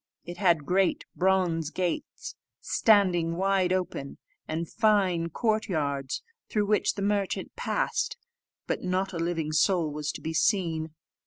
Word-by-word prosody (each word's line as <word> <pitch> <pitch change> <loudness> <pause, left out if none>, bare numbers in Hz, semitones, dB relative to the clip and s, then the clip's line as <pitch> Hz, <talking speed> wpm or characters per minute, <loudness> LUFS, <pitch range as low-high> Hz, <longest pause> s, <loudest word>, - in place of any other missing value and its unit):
It 175 0 -7
had 170 -6 +3
great 185 +4 +1
bronze 180 -4 +1
gates, 175 0 -3 0.3
standing 180 -6 +3
wide 190 -1 +2
open, 180 -7 -2 0.3
and 165 +2 -3
fine 195 -6 +2
court 220 +4 0
yards, 140 -5 -2 0.3
through 210 -1 +1
which 210 0 +1
the 200 - -3
merchant 200 -1 -1
passed; - - -1 0.5
but - - -2
not 185 +1 -1
a 170 - -3
living 165 -2 -1
soul 160 +1 +2
was 150 +1 -3
to - - -8
be 160 - -3
seen. 160 -4 +1
180 Hz, 140 wpm, -28 LUFS, 160-195 Hz, 0.5 s, had